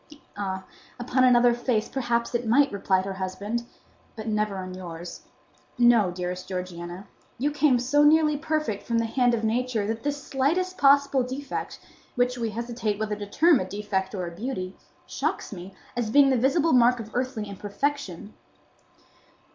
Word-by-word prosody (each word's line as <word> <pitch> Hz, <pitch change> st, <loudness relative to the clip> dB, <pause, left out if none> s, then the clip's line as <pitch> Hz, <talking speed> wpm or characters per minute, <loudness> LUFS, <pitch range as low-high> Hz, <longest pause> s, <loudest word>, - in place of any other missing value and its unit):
"Ah, 190 Hz, -2 st, -4 dB, 0.3 s
upon 255 Hz, +1 st, +1 dB
another 245 Hz, -1 st, +5 dB
face 240 Hz, -2 st, 0 dB
perhaps 240 Hz, -3 st, -1 dB
it 240 Hz, -1 st, -1 dB
might," 275 Hz, +5 st, +4 dB
replied 195 Hz, -2 st, +1 dB
her 195 Hz, -, -3 dB
husband; 200 Hz, +5 st, -4 dB, 0.5 s
"but 220 Hz, -1 st, -7 dB
never 210 Hz, -2 st, 0 dB
on 185 Hz, -1 st, -6 dB
yours. 175 Hz, -2 st, -8 dB, 0.6 s
No, 240 Hz, -5 st, +5 dB
dearest 180 Hz, +1 st, -5 dB
Georgiana, 180 Hz, 0 st, -6 dB, 0.3 s
you 285 Hz, +5 st, 0 dB
came 295 Hz, -3 st, +3 dB
so 265 Hz, +5 st, +2 dB
nearly 305 Hz, 0 st, +5 dB
perfect 305 Hz, -8 st, -2 dB
from 230 Hz, -, -1 dB
the 230 Hz, -, +1 dB
hand 245 Hz, +1 st, +2 dB
of 225 Hz, -, -4 dB
Nature 230 Hz, -1 st, 0 dB
that 225 Hz, +2 st, -3 dB
this 290 Hz, 0 st, -3 dB
slightest 340 Hz, +8 st, 0 dB
possible 280 Hz, -3 st, +4 dB
defect, 260 Hz, +2 st, -5 dB, 0.4 s
which 245 Hz, 0 st, +1 dB
we 230 Hz, -2 st, -2 dB
hesitate 230 Hz, -1 st, -3 dB
whether 215 Hz, -1 st, -1 dB
to 205 Hz, 0 st, -7 dB
term 320 Hz, +7 st, +4 dB
a -, -, -1 dB
defect 190 Hz, 0 st, -3 dB
or 185 Hz, -2 st, -3 dB
a 170 Hz, -, -6 dB
beauty, 195 Hz, -4 st, -4 dB, 0.3 s
shocks -, -, -3 dB
me, 185 Hz, 0 st, -8 dB, 0.2 s
as 240 Hz, -3 st, -1 dB
being 275 Hz, +3 st, +5 dB
the -, -, +3 dB
visible 280 Hz, +7 st, +2 dB
mark 245 Hz, 0 st, +5 dB
of 220 Hz, -1 st, -8 dB
earthly 250 Hz, -3 st, -2 dB
imperfection." 205 Hz, 0 st, -4 dB
235 Hz, 165 wpm, -26 LUFS, 200-265 Hz, 0.6 s, another